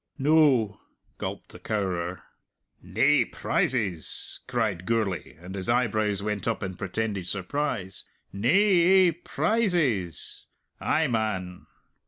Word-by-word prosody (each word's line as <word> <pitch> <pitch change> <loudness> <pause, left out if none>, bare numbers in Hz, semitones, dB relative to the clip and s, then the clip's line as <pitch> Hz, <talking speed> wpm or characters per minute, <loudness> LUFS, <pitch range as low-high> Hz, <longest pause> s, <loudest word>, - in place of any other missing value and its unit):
"No," 135 -8 +3 0.4
gulped - - -5
the - - -12
cowerer. 90 -4 -2 0.6
"Nae - - +3
prizes!" 100 -10 -1
cried 95 -5 -1
Gourlay, 110 -7 -1
and 90 +2 -9
his 95 +2 -4
eyebrows 110 -4 +1
went 105 0 -2
up 115 -2 -1
in 95 - -2
a - - -11
pretended 100 0 -3
surprise. 100 -1 -2 0.3
"Nae 100 +5 0
ae 190 -1 +5
prizes! 165 - -1 0.3
Ay, 160 - +1
man! 105 -8 -2
110 Hz, 110 wpm, -27 LUFS, 95-140 Hz, 0.6 s, ae